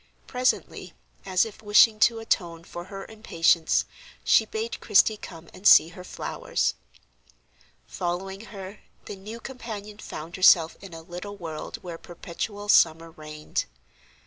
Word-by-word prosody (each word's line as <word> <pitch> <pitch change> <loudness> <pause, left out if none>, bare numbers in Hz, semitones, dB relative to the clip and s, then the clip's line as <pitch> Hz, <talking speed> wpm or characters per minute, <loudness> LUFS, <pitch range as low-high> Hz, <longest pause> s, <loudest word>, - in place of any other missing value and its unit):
Presently, 250 0 -1 0.3
as 185 +1 +3
if 220 -1 -10
wishing 215 +1 +5
to 230 +1 +4
atone 175 -7 -2
for 175 0 -8
her 195 +1 -8
impatience, 170 -7 +1 0.4
she - - +4
bade 445 +1 -4
Christie 220 - +4
come 165 -5 -11
and 200 - -1
see 160 - +8
her 180 +1 -11
flowers. - - -2 1.1
Following 190 +4 -4
her, 195 -1 -9 0.3
the - - -7
new 210 +4 -9
companion 215 -5 -8
found 165 -2 -8
herself 170 -3 +6
in 190 -4 -10
a 165 - -10
little 180 +4 -8
world 160 -4 -6
where 170 -2 -7
perpetual 205 +4 -6
summer 165 -4 +4
reigned. 155 -1 -5
190 Hz, 135 wpm, -26 LUFS, 170-215 Hz, 1.1 s, see